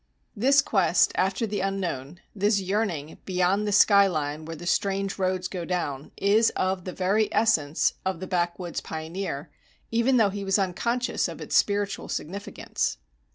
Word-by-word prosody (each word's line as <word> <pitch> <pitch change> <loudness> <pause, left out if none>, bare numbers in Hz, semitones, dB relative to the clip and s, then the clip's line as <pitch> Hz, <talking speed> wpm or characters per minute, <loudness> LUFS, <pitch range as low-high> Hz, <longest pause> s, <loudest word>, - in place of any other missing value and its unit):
This 275 +6 +4
quest 185 - +3
after 190 +4 0
the 205 -2 -3
unknown, 180 -6 -3
this 205 +1 +2
yearning 190 -6 -2
"beyond 185 +3 +1
the - - 0
sky 200 0 +6
line, 155 -3 -3
where 165 +1 -6
the 170 +3 -9
strange 195 +2 0
roads 185 -1 0
go 180 -3 -5
down," 155 -6 -3
is 215 +3 +4
of 185 -1 -1
the 185 - -4
very 200 +4 +1
essence 165 -10 +2
of 190 -2 -2
the 185 - -5
backwoods 175 -1 -2
pioneer, 160 -1 -5 0.4
even 235 +3 +3
though 210 -4 +4
he 200 0 -5
was 195 +1 +2
unconscious 235 +6 0
of - - -8
its - - -4
spiritual 205 -1 +1
significance. 200 +6 -3
190 Hz, 155 wpm, -26 LUFS, 175-205 Hz, 0.4 s, sky